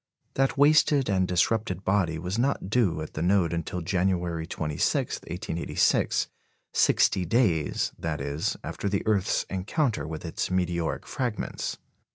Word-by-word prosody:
That 135 +1 +1
wasted 145 -2 +4
and 95 -1 +2
disrupted 95 +1 0
body 95 -5 +1
was 90 +7 -3
not 125 -6 0
due 95 -10 +2
at - - -9
the 75 - -4
node 90 -1 +2
until 85 +2 -3
January 85 -2 0
26, 75 -3 -1
1886, 85 -1 0 0.5
sixty 95 - +3
days, 90 - +1
that 80 -2 -2
is, 70 +2 -2
after 100 - -3
the 100 0 -1
earth's 105 -4 +1
encounter 95 - -1
with 80 +1 -6
its 80 - -3
meteoric 85 -3 -1
fragments. 120 -7 -3
90 Hz, 135 wpm, -27 LUFS, 80-105 Hz, 0.5 s, wasted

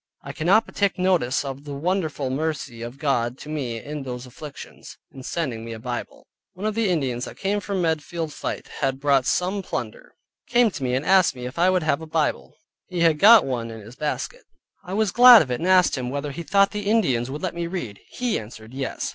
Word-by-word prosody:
I - - -7
cannot 195 +8 +3
but - - -14
take 200 -1 +1
notice 180 -9 +1
of 135 0 -6
the 145 -1 -6
wonderful 155 -4 -1
mercy 140 -4 -3
of 120 +3 -7
God 125 -4 0
to 150 - -10
me 130 -7 -3
in 150 +5 -6
those 125 -1 -6
afflictions, 140 +3 -11
in 135 - -11
sending 130 -5 -3
me 115 0 -6
a 110 - -8
Bible. 120 +1 -6 0.3
One 190 +4 -7
of 215 - 0
the 225 -2 0
Indians 130 -8 -1
that - - -10
came 200 +1 0
from 200 -3 -2
Medfield 160 0 -2
fight, - - -5
had 135 -1 -1
brought 140 -2 +2
some 190 +3 0
plunder, 120 - -6 0.3
came 240 -2 +4
to 160 - -7
me, 125 -1 0
and 135 +3 -2
asked 190 -7 +4
me, 125 -1 -7
if 125 +6 -6
I 180 +2 +5
would 185 -2 +1
have 155 0 +1
a 160 - -8
Bible, 150 - -1 0.3
he 180 -2 -3
had 165 -3 +4
got 220 +3 +8
one 120 -3 -3
in 110 -1 -9
his 110 +4 -13
basket. 150 - -4 0.4
I 185 - -5
was 215 -2 +1
glad 245 -2 +9
of 130 - -8
it, 125 - -1
and 170 - -2
asked 185 -2 +5
him, 125 -1 -3
whether 140 +2 -3
he 145 - -6
thought 195 +5 +3
the 205 -1 -3
Indians 130 - +2
would 150 +5 -6
let 185 - -2
me 170 0 -3
read? 145 - -5
He 245 -3 -1
answered, 110 +1 -11
yes. 135 0 -3
150 Hz, 230 wpm, -23 LUFS, 130-185 Hz, 0.4 s, glad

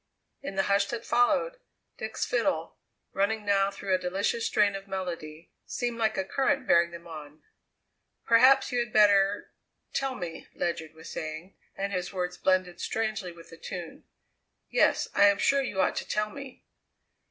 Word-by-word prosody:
In 280 -8 -6
the 195 - +2
hush 200 0 +2
that 235 +1 -5
followed, 475 - +2 0.4
Dick's - - -3
fiddle, - - -1 0.3
running 210 +2 0
now 195 -1 +3
through 200 -1 -3
a 185 - +3
delicious 195 +5 -1
strain 205 -1 +2
of 195 0 -7
melody, 170 -4 -6 0.2
seemed 240 -1 -3
like 220 -1 +1
a 190 - 0
current 270 +4 0
bearing 170 -5 +4
them 170 0 -11
on. 155 -2 -10 0.8
"Perhaps 255 +5 +5
you 245 - +1
had 235 -2 -2
better 205 -1 +4 0.4
tell 270 -1 -1
me," 175 -6 -7
Ledyard 160 -2 -3
was 160 +1 -11
saying, 155 +4 -6 0.2
and 200 +1 -3
his 180 -1 -2
words 180 -2 -3
blended 185 -2 +1
strangely 215 -5 -2
with 170 0 -15
the 165 - -11
tune. 175 -1 -8 0.7
"Yes, - - +3
I 200 - +6
am 200 0 +4
sure 275 +6 +3
you 210 -7 -4
ought 185 - +2
to - - -3
tell 210 0 -1
me." 275 -1 -10
195 Hz, 165 wpm, -28 LUFS, 175-225 Hz, 0.8 s, I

